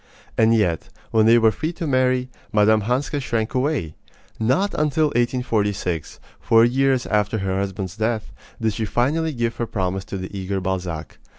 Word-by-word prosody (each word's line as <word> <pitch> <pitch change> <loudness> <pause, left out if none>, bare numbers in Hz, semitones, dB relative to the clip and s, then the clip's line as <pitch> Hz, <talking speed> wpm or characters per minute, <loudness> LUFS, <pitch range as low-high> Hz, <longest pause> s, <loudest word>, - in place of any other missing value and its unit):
And 115 0 +4
yet, 90 -7 0 0.2
when 110 -1 +4
they 115 +1 +7
were 110 -1 +5
free 155 +10 -3
to 170 - -5
marry, 130 -2 +2 0.2
Mme. 110 +1 +4
Hanska 130 +7 -1
shrank 115 -4 -2
away. 130 - 0 0.5
Not 135 - +1
until 150 0 +1
1846, 105 - -1 0.2
four 115 0 +5
years 130 +1 +2
after 105 +1 +1
her 95 -1 -1
husband's 95 -1 -4
death, 110 0 -1 0.3
did 110 -2 0
she 110 +1 -2
finally 150 +9 0
give 120 -4 -2
her 120 - -2
promise 95 -2 -2
to 95 - -5
the 95 +1 -7
eager 95 0 -2
Balzac. 90 -4 -4
110 Hz, 165 wpm, -22 LUFS, 100-130 Hz, 0.5 s, they